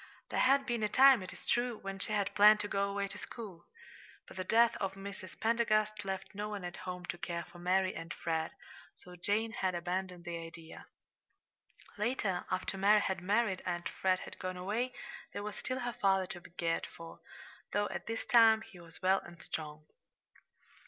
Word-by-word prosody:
There -, -, 0 dB
had 275 Hz, +1 st, +5 dB
been 240 Hz, -2 st, -1 dB
a 210 Hz, -, +1 dB
time, 265 Hz, -2 st, +7 dB
it 185 Hz, -, -6 dB
is -, -, -11 dB
true, 240 Hz, -1 st, +1 dB
when 195 Hz, -1 st, -6 dB
she 205 Hz, -, -4 dB
had 205 Hz, -2 st, 0 dB
planned 210 Hz, +1 st, +8 dB
to 205 Hz, -, -3 dB
go 200 Hz, 0 st, 0 dB
away 200 Hz, 0 st, -1 dB
to 195 Hz, -, -7 dB
school; 200 Hz, -8 st, -8 dB, 0.6 s
but -, -, -12 dB
the 185 Hz, -, -2 dB
death 230 Hz, +4 st, +4 dB
of 195 Hz, 0 st, -2 dB
Mrs. 195 Hz, -2 st, -8 dB
Pendergast 215 Hz, -2 st, +2 dB
left 190 Hz, 0 st, -4 dB
no 210 Hz, +1 st, -3 dB
one 205 Hz, -3 st, -5 dB
at 175 Hz, -, -5 dB
home 180 Hz, -1 st, -6 dB
to 175 Hz, -, -5 dB
care 170 Hz, -2 st, -3 dB
for 175 Hz, -, -14 dB
Mary 185 Hz, +1 st, +2 dB
and 165 Hz, 0 st, -7 dB
Fred, 160 Hz, -1 st, -1 dB, 0.5 s
so 180 Hz, 0 st, -12 dB
Jane 210 Hz, +5 st, 0 dB
had 185 Hz, -4 st, -1 dB
abandoned 180 Hz, 0 st, -3 dB
the 170 Hz, -1 st, -4 dB
idea. 165 Hz, 0 st, -10 dB, 1.1 s
Later, 210 Hz, -5 st, 0 dB
after 185 Hz, +1 st, -2 dB
Mary 205 Hz, +2 st, +6 dB
had 190 Hz, -3 st, -1 dB
married 200 Hz, 0 st, +1 dB
and 175 Hz, -1 st, -2 dB
Fred 185 Hz, -1 st, +1 dB
had -, -, -9 dB
gone 185 Hz, 0 st, -4 dB
away, 215 Hz, +8 st, -1 dB, 0.4 s
there 205 Hz, -, -4 dB
was 210 Hz, -1 st, -5 dB
still 255 Hz, 0 st, -3 dB
her 245 Hz, -1 st, -2 dB
father 195 Hz, -3 st, +2 dB
to 180 Hz, -2 st, -8 dB
be -, -, -14 dB
cared 170 Hz, -1 st, -1 dB
for, 165 Hz, 0 st, -11 dB, 0.5 s
though 205 Hz, 0 st, +1 dB
at -, -, -5 dB
this 225 Hz, 0 st, -3 dB
time 225 Hz, -2 st, +6 dB
he 180 Hz, -, -14 dB
was 170 Hz, +1 st, -13 dB
well 190 Hz, +1 st, +5 dB
and 175 Hz, -1 st, -13 dB
strong. 150 Hz, -1 st, -5 dB
195 Hz, 195 wpm, -33 LUFS, 180-215 Hz, 1.1 s, planned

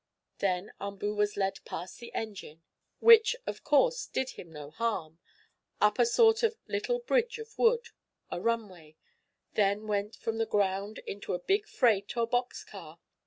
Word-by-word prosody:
Then 185 Hz, 0 st, -1 dB
Umboo 200 Hz, +1 st, -3 dB
was 210 Hz, 0 st, 0 dB
led 195 Hz, -1 st, -1 dB
past 180 Hz, +2 st, -7 dB
the 235 Hz, -, -10 dB
engine, 190 Hz, -7 st, -6 dB, 0.4 s
(which, 460 Hz, +1 st, +7 dB
of -, -, -5 dB
course, -, -, +3 dB
did 265 Hz, 0 st, -2 dB
him 170 Hz, -, -11 dB
no 150 Hz, -2 st, -9 dB
harm) 170 Hz, -6 st, -3 dB, 0.6 s
up 210 Hz, +3 st, +3 dB
a 240 Hz, -, +5 dB
sort 445 Hz, -, +5 dB
of 455 Hz, -1 st, +1 dB
little 425 Hz, +4 st, -1 dB
bridge 475 Hz, -1 st, 0 dB
of 450 Hz, -1 st, -10 dB
wood 470 Hz, 0 st, +2 dB, 0.4 s
a 175 Hz, -, -3 dB
runway 195 Hz, -9 st, -3 dB, 0.6 s
that 200 Hz, -1 st, +2 dB
went 210 Hz, 0 st, -2 dB
from 225 Hz, 0 st, -4 dB
the 225 Hz, -, +1 dB
ground 200 Hz, 0 st, 0 dB
into 200 Hz, -2 st, -4 dB
a -, -, -4 dB
big 410 Hz, +2 st, +2 dB
freight, 220 Hz, -3 st, +1 dB
or 235 Hz, -, +3 dB
box 245 Hz, +2 st, -1 dB
car. 170 Hz, -6 st, -11 dB
215 Hz, 165 wpm, -30 LUFS, -, 0.6 s, which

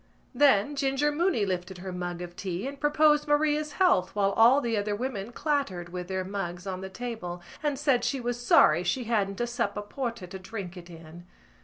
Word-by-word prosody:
Then 270 Hz, -1 st, +4 dB
Ginger 275 Hz, +1 st, +1 dB
Mooney 295 Hz, -, +1 dB
lifted 185 Hz, -1 st, -3 dB
up 180 Hz, -, -11 dB
her 190 Hz, -, -5 dB
mug 175 Hz, -1 st, -4 dB
of 175 Hz, 0 st, -9 dB
tea 185 Hz, +2 st, -4 dB
and 280 Hz, 0 st, -7 dB
proposed 300 Hz, 0 st, +3 dB
Maria's 300 Hz, 0 st, +1 dB
health 285 Hz, -, +2 dB
while 200 Hz, -1 st, +2 dB
all 235 Hz, +7 st, +6 dB
the 235 Hz, -4 st, -1 dB
other 205 Hz, 0 st, -1 dB
women 235 Hz, -2 st, -4 dB
clattered 245 Hz, -, -2 dB
with 180 Hz, 0 st, -6 dB
their 190 Hz, 0 st, -2 dB
mugs 185 Hz, -2 st, -5 dB
on 190 Hz, -1 st, -4 dB
the 190 Hz, -, -6 dB
table, 190 Hz, -5 st, -5 dB, 0.2 s
and 295 Hz, -2 st, -1 dB
said 275 Hz, -3 st, +2 dB
she 275 Hz, -, 0 dB
was 240 Hz, 0 st, -3 dB
sorry 170 Hz, -7 st, +5 dB
she 245 Hz, +8 st, 0 dB
hadn't 205 Hz, -4 st, -1 dB
a 240 Hz, -, +1 dB
sup 235 Hz, -4 st, -2 dB
of 205 Hz, 0 st, -6 dB
porter 235 Hz, -7 st, -4 dB
to 190 Hz, +2 st, -8 dB
drink 190 Hz, -2 st, -7 dB
it 175 Hz, -1 st, -11 dB
in. 165 Hz, +1 st, -12 dB
210 Hz, 205 wpm, -28 LUFS, 185-275 Hz, 0.2 s, all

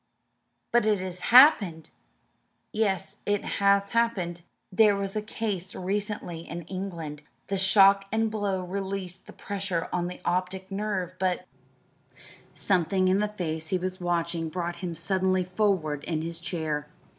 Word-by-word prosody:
"But 240 Hz, -2 st, +3 dB
it 210 Hz, -1 st, +3 dB
has 185 Hz, -1 st, -6 dB
happened?" 210 Hz, -, +6 dB, 0.8 s
"Yes, 210 Hz, -3 st, 0 dB
it 205 Hz, -1 st, +1 dB
has 200 Hz, 0 st, +2 dB
happened. 200 Hz, -8 st, 0 dB, 0.3 s
There 210 Hz, +1 st, +5 dB
was 195 Hz, 0 st, -3 dB
a 215 Hz, -, 0 dB
case 205 Hz, -4 st, -4 dB
recently 200 Hz, -2 st, -3 dB
in 170 Hz, +1 st, -7 dB
England. 170 Hz, -5 st, -6 dB, 0.3 s
The 195 Hz, -1 st, 0 dB
shock 195 Hz, 0 st, +6 dB
and 220 Hz, 0 st, +1 dB
blow 200 Hz, -3 st, -1 dB
released 190 Hz, 0 st, -5 dB
the -, -, -11 dB
pressure 195 Hz, -4 st, -3 dB
on 175 Hz, -1 st, 0 dB
the 180 Hz, -, -7 dB
optic 185 Hz, +2 st, -2 dB
nerve; 195 Hz, -3 st, -2 dB
but 185 Hz, -1 st, 0 dB, 0.6 s
" -, -, -22 dB, 0.3 s
Something 185 Hz, 0 st, +2 dB
in 190 Hz, +2 st, +3 dB
the 210 Hz, -, +1 dB
face 160 Hz, -6 st, -4 dB
he 185 Hz, -, +1 dB
was 185 Hz, +1 st, -4 dB
watching 170 Hz, -1 st, -1 dB
brought 175 Hz, 0 st, -3 dB
him 170 Hz, -2 st, -4 dB
suddenly 185 Hz, +2 st, +1 dB
forward 180 Hz, -6 st, 0 dB
in 160 Hz, -2 st, -2 dB
his 165 Hz, 0 st, -4 dB
chair. 155 Hz, -4 st, -3 dB
185 Hz, 145 wpm, -27 LUFS, 175-200 Hz, 0.8 s, happened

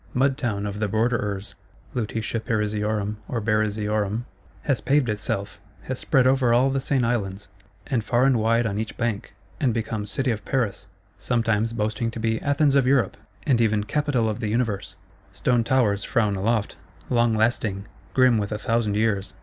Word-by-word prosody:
Mud 135 Hz, +1 st, +3 dB
Town 110 Hz, -7 st, -2 dB
of 105 Hz, 0 st, -4 dB
the 105 Hz, -, 0 dB
Borderers 105 Hz, -2 st, -1 dB, 0.4 s
(Lutetia 115 Hz, 0 st, -2 dB
Parisiorum 105 Hz, -2 st, -1 dB
or 120 Hz, -, -2 dB
Barisiorum) 105 Hz, 0 st, 0 dB, 0.4 s
has 135 Hz, -7 st, 0 dB
paved 140 Hz, -3 st, +2 dB
itself, 100 Hz, -1 st, -3 dB, 0.2 s
has -, -, -4 dB
spread 130 Hz, -1 st, +3 dB
over 130 Hz, -2 st, +3 dB
all 130 Hz, +3 st, +3 dB
the 135 Hz, -, 0 dB
Seine 130 Hz, -2 st, +1 dB
Islands, 105 Hz, -4 st, -2 dB, 0.4 s
and 120 Hz, -4 st, -1 dB
far 120 Hz, +3 st, +2 dB
and 135 Hz, -3 st, +4 dB
wide 115 Hz, +2 st, +2 dB
on 105 Hz, -2 st, -1 dB
each 110 Hz, 0 st, -5 dB
bank, 115 Hz, -4 st, -2 dB, 0.2 s
and 125 Hz, -5 st, +1 dB
become 110 Hz, -2 st, -3 dB
City 130 Hz, +5 st, 0 dB
of 105 Hz, -2 st, -4 dB
Paris, 110 Hz, -7 st, -1 dB, 0.3 s
sometimes 115 Hz, -2 st, +1 dB
boasting 110 Hz, +1 st, -1 dB
to 115 Hz, -, -6 dB
be 110 Hz, 0 st, 0 dB
"Athens 145 Hz, 0 st, +2 dB
of 135 Hz, -2 st, +4 dB
Europe," 130 Hz, -7 st, +2 dB, 0.3 s
and 125 Hz, -4 st, +3 dB
even 110 Hz, -2 st, +2 dB
"Capital 145 Hz, -2 st, 0 dB
of 110 Hz, -1 st, -2 dB
the 110 Hz, -, -2 dB
Universe." 115 Hz, -3 st, -1 dB, 0.4 s
Stone 120 Hz, -2 st, +1 dB
towers 110 Hz, -7 st, +2 dB
frown 105 Hz, -4 st, +1 dB
aloft; 105 Hz, +2 st, 0 dB, 0.3 s
long 120 Hz, -2 st, +3 dB
lasting, 110 Hz, -3 st, 0 dB, 0.3 s
grim 130 Hz, -3 st, +5 dB
with 100 Hz, 0 st, -3 dB
a 105 Hz, -, -1 dB
thousand 110 Hz, -1 st, 0 dB
years. 105 Hz, -2 st, 0 dB
110 Hz, 170 wpm, -24 LUFS, 105-120 Hz, 0.4 s, grim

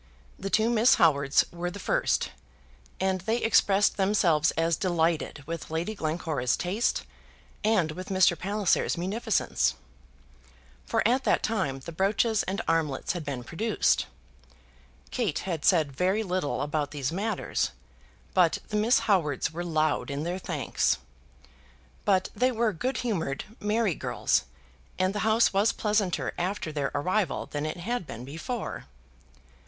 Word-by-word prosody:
The 195 Hz, -, -4 dB
two 220 Hz, +3 st, +3 dB
Miss 235 Hz, +1 st, +5 dB
Howards 140 Hz, -5 st, +4 dB
were 175 Hz, +1 st, -3 dB
the 180 Hz, -, -8 dB
first, -, -, 0 dB, 0.7 s
and 190 Hz, -1 st, 0 dB
they 220 Hz, +5 st, 0 dB
expressed 205 Hz, -3 st, +3 dB
themselves 180 Hz, -6 st, +3 dB
as 165 Hz, 0 st, +2 dB
delighted 165 Hz, -4 st, 0 dB
with 165 Hz, +1 st, -5 dB
Lady 165 Hz, +6 st, -2 dB
Glencora's 155 Hz, -, -1 dB
taste 200 Hz, +7 st, 0 dB, 0.6 s
and 200 Hz, -7 st, +2 dB
with 185 Hz, +4 st, -7 dB
Mr. 185 Hz, -2 st, +4 dB
Palliser's 200 Hz, +1 st, 0 dB
munificence, 205 Hz, +5 st, 0 dB, 1.1 s
for 225 Hz, -1 st, +2 dB
at 255 Hz, +3 st, +2 dB
that -, -, +2 dB
time 185 Hz, -12 st, -1 dB
the 170 Hz, -, -8 dB
brooches 205 Hz, +5 st, +1 dB
and 195 Hz, +4 st, -3 dB
armlets 160 Hz, -4 st, 0 dB
had 175 Hz, -3 st, -4 dB
been 140 Hz, -4 st, -4 dB
produced. 220 Hz, -, +1 dB, 1.0 s
Kate 220 Hz, -, -1 dB
had 170 Hz, -5 st, -3 dB
said 160 Hz, -6 st, +3 dB
very 185 Hz, +9 st, +1 dB
little 180 Hz, -6 st, -1 dB
about 150 Hz, 0 st, -1 dB
these 145 Hz, -1 st, -3 dB
matters, 205 Hz, +6 st, -1 dB, 0.6 s
but 180 Hz, -3 st, +4 dB
the 210 Hz, -, -1 dB
Miss 225 Hz, +4 st, +3 dB
Howards 155 Hz, -8 st, +1 dB
were 175 Hz, +2 st, -4 dB
loud 155 Hz, -4 st, 0 dB
in 140 Hz, +1 st, -3 dB
their 175 Hz, +3 st, -3 dB
thanks. 160 Hz, -7 st, 0 dB, 1.1 s
But 190 Hz, -2 st, +2 dB
they 255 Hz, +1 st, +2 dB
were 230 Hz, -2 st, +1 dB
good 255 Hz, +11 st, -2 dB
humoured, 165 Hz, -, -2 dB, 0.2 s
merry 210 Hz, -2 st, +1 dB
girls, -, -, 0 dB, 0.5 s
and 185 Hz, +1 st, +1 dB
the 210 Hz, -, -2 dB
house 220 Hz, +1 st, +3 dB
was 200 Hz, +3 st, +3 dB
pleasanter 210 Hz, -4 st, 0 dB
after 180 Hz, -2 st, -2 dB
their 145 Hz, -2 st, -1 dB
arrival 185 Hz, +4 st, 0 dB
than 145 Hz, +1 st, -3 dB
it 155 Hz, -, -4 dB
had 195 Hz, 0 st, -3 dB
been 120 Hz, -, -7 dB
before. 165 Hz, -, -5 dB
185 Hz, 140 wpm, -27 LUFS, 155-210 Hz, 1.1 s, Miss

